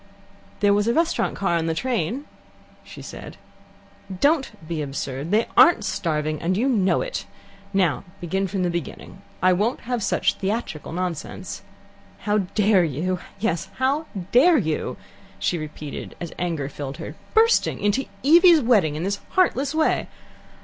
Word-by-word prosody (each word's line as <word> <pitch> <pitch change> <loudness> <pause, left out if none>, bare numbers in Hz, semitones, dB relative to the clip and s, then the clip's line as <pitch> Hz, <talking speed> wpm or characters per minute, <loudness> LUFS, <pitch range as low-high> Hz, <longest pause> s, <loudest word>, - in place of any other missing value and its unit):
"There 205 -1 +5
was 205 +1 +1
a 235 - +2
restaurant 330 0 +1
car 175 -4 +1
on 165 0 -1
the 165 - 0
train," 245 - -2 0.6
she - - -11
said. - - -9 0.8
"Don't 290 - +3 0.2
be 165 -2 -3
absurd. 140 +1 -4
They 215 +4 +3
aren't 345 - +6
starving, 155 -2 -1
and 185 +3 0
you 245 +5 +1
know 205 -8 +2
it. - - -4 0.4
Now, 190 -6 +1 0.2
begin 190 +3 -1
from 190 0 -2
the 175 - 0
beginning. 170 -4 -6 0.2
I 185 0 +6
won't 210 +7 0
have 245 -1 -2
such - - +1
theatrical 195 -7 -3
nonsense. 175 -2 -4 0.6
How 210 0 +1
dare 200 0 +2
you! 170 +4 -1 0.2
Yes, 190 -3 -1
how 280 +4 0 0.2
dare 315 +7 +6
you!" 160 - -2 0.4
she 175 - -1
repeated, 150 -1 -7
as 170 -1 -6
anger 165 -6 -2
filled 140 0 -6
her, 165 - -7 0.2
"bursting 455 +1 +4
in 205 - +2
to 270 +5 -1 0.2
Evie's 340 +2 +7
wedding 210 - +3
in 155 - -3
this 200 +2 -1 0.2
heartless 290 -6 +2
way. 315 0 +1
195 Hz, 155 wpm, -23 LUFS, 165-250 Hz, 0.8 s, Evie's